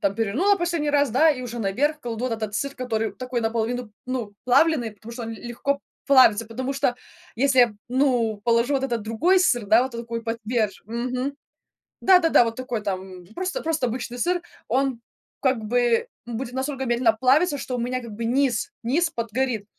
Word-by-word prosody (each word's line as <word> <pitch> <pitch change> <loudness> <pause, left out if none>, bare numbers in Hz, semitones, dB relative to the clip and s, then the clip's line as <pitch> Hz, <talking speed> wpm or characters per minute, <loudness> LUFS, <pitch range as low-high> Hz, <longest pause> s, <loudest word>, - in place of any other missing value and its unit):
там 200 0 +1
перевернула 250 - +2
последний 340 -4 -1
раз, 285 -2 +2
да, 310 +8 +5
и 265 -4 -2
уже 240 -1 -6
наверх 280 +10 0
кладу 235 -2 -4
вот 255 - -1
этот 215 -2 -4
сыр, 280 +5 -2
который 225 -5 -2
такой 250 +4 -4
наполовину, 230 +1 -2
ну, 250 -5 -3
плавленый, 255 -2 +3
потому 215 +3 -12
что 235 +1 -6
он 225 - -5
ль 225 - -9
легко 245 +4 -2 0.3
плавится. 255 -5 +6
Потому 255 +4 -4
что 270 -3 0 0.4
если 270 +2 +2
я, 245 - +7
п 210 - -14
ну, 245 -5 +1
положу 235 +3 +2
вот 270 - 0
этот 235 -4 -2
другой 265 - +2
сыр, 245 - +2
да, 220 +4 +5
вот, 260 -1 -4
э, - - -4
такой 230 0 -5
потверже 225 -3 -2
Мгм. 250 +4 -3 0.7
Да-да-да, 360 -8 +6
вот 230 -1 -3
такой 245 -3 -3
там 185 -2 -5
просто, 370 +4 -3
просто 315 -5 0
обычный 240 +1 -5
сыр, 355 +5 +1 0.3
он 265 0 0 0.4
как 260 -3 +2
бы 240 +1 +2 0.2
будет 240 +1 -5
настолько 265 +1 -3
медленно 240 -1 +3
плавиться, 280 +7 +3
что 255 -2 -4
у - - -2
меня 250 +2 -2
как 235 -2 -9
бы 225 +2 -5
низ 270 - +1
низ 315 +9 +1
подгорит. 230 -3 -2
245 Hz, 190 wpm, -24 LUFS, 225-275 Hz, 0.7 s, я